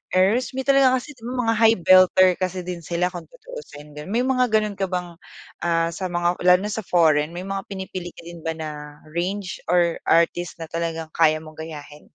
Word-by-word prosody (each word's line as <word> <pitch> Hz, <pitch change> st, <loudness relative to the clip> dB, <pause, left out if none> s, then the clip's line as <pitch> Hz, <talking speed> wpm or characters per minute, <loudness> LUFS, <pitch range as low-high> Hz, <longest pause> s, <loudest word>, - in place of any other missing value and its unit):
Heirs 220 Hz, +8 st, +2 dB
may 265 Hz, -, -2 dB
talaga 270 Hz, -1 st, +4 dB
kasi 260 Hz, +4 st, -5 dB
mga 235 Hz, 0 st, -1 dB
high 225 Hz, 0 st, +4 dB
belter 185 Hz, 0 st, +6 dB
kasi 185 Hz, 0 st, -2 dB
din 175 Hz, -1 st, -5 dB
sila 175 Hz, +2 st, -1 dB
kung 175 Hz, -2 st, -8 dB
tutuusin 475 Hz, -, -11 dB
gano'n, 150 Hz, +2 st, -9 dB
may 230 Hz, +6 st, 0 dB
mga 255 Hz, -1 st, +2 dB
gano'n 215 Hz, -3 st, 0 dB
ka 195 Hz, -, 0 dB
bang, 180 Hz, -2 st, -5 dB, 0.4 s
ah, 165 Hz, -1 st, 0 dB
sa 185 Hz, +2 st, -4 dB
mga 175 Hz, 0 st, -1 dB
lalo 180 Hz, 0 st, +7 dB
na 210 Hz, -, -3 dB
sa 220 Hz, -, -3 dB
foreign 165 Hz, -4 st, +2 dB
may 180 Hz, -, -5 dB
mga 195 Hz, 0 st, -5 dB
pinipili 190 Hz, -2 st, -7 dB
ka -, -, -12 dB
din 170 Hz, 0 st, -10 dB
ba 160 Hz, 0 st, -4 dB
na 150 Hz, -2 st, -8 dB
range 180 Hz, +3 st, -3 dB
or 175 Hz, -1 st, +2 dB
artist 170 Hz, +1 st, +2 dB
na -, -, -5 dB
talagang 165 Hz, -1 st, -3 dB
kaya 155 Hz, -1 st, +2 dB
mong 155 Hz, 0 st, -13 dB
gayahin? 150 Hz, -2 st, -9 dB
180 Hz, 200 wpm, -23 LUFS, 165-205 Hz, 0.4 s, lalo